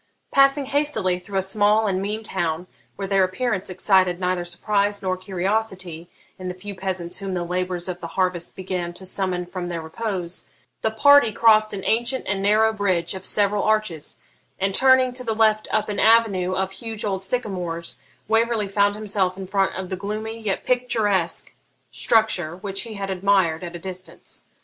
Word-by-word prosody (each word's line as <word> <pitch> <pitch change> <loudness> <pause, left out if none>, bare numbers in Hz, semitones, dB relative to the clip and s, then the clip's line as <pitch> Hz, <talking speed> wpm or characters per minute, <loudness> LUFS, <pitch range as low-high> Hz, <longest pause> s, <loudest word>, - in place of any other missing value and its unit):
Passing 275 0 +4
hastily 260 -11 0
through 195 +2 -5
a 190 - +2
small 210 +2 +3
and 190 -2 0
mean 210 +3 -3
town, 175 -4 -2 0.3
where 195 - -4
their 195 -1 +3
appearance 190 +1 -1
excited 185 -1 +2
neither 180 -1 0
surprise 200 +3 -1
nor 185 -1 0
curiosity 185 -2 -3 0.3
in 185 - -6
the 180 - -4
few 200 +2 -7
peasants 185 -3 -3
whom 195 -2 -4
the 175 - -1
labours 180 0 -2
of 180 -1 -4
the 170 - -6
harvest 180 -2 0
began 180 -2 -4
to 190 - -4
summon 185 -1 -1
from 180 0 -5
their 170 -1 -3
repose, 180 +1 -4 0.3
the 220 - +1
party 285 +2 +6
crossed 215 -1 +4
an 195 -1 -5
ancient 240 +3 +1
and 195 0 -1
narrow 215 +2 +3
bridge 195 -5 0
of 190 0 -4
several 205 0 +2
arches, 215 -8 -1 0.4
and, 195 0 0
turning 260 +1 +5
to 250 0 -3
the 225 -2 -1
left 215 -1 +3
up 215 -1 0
an 210 - -3
avenue 205 -5 +4
of 190 0 -1
huge 220 +2 -5
old 190 -2 -2
sycamores, 185 -6 -2 0.3
Waverley 225 -1 +1
found 200 +1 +2
himself 200 -3 -1
in 190 - -6
front 195 0 0
of 185 -1 -5
the 185 - -2
gloomy 215 +4 -5
yet 210 -3 -2
picturesque 215 -8 +1 0.4
structure 190 -8 +2
which 195 +1 -2
he 225 0 -7
had 195 -1 -4
admired 185 -3 +2
at 175 0 -6
a - - -6
distance. 185 +1 -8
195 Hz, 180 wpm, -23 LUFS, 185-215 Hz, 0.4 s, party